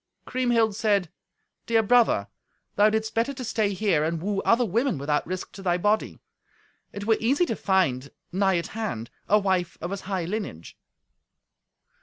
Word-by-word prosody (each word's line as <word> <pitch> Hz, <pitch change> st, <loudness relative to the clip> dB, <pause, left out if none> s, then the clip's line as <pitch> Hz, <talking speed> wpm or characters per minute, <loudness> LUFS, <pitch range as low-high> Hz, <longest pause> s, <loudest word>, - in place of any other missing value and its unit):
Kriemhild 240 Hz, -4 st, +1 dB
said, 200 Hz, -5 st, +1 dB, 0.6 s
"Dear 225 Hz, -1 st, +3 dB
brother, 225 Hz, -, +3 dB, 0.5 s
thou 210 Hz, +1 st, +5 dB
didst 220 Hz, 0 st, -1 dB
better 235 Hz, +5 st, 0 dB
to 255 Hz, -, -6 dB
stay 215 Hz, -3 st, 0 dB
here 190 Hz, -6 st, +1 dB
and 165 Hz, +1 st, -1 dB
woo 195 Hz, +3 st, -1 dB
other 240 Hz, +1 st, +3 dB
women 230 Hz, -, 0 dB
without 145 Hz, +2 st, -1 dB
risk 185 Hz, +1 st, -5 dB
to 195 Hz, -, -10 dB
thy 180 Hz, -2 st, +1 dB
body. 210 Hz, +4 st, 0 dB, 0.7 s
It 205 Hz, 0 st, -6 dB
were 225 Hz, 0 st, +3 dB
easy 275 Hz, +10 st, +2 dB
to 225 Hz, -, -2 dB
find, 140 Hz, -11 st, +1 dB, 0.2 s
nigh 190 Hz, 0 st, +2 dB
at 170 Hz, -, -3 dB
hand, 125 Hz, -, -4 dB, 0.2 s
a 210 Hz, -, +6 dB
wife 190 Hz, -4 st, 0 dB
of 175 Hz, -, -5 dB
as 200 Hz, -, -4 dB
high 185 Hz, -3 st, -3 dB
lineage." 190 Hz, -, -5 dB
205 Hz, 165 wpm, -25 LUFS, 180-225 Hz, 0.7 s, a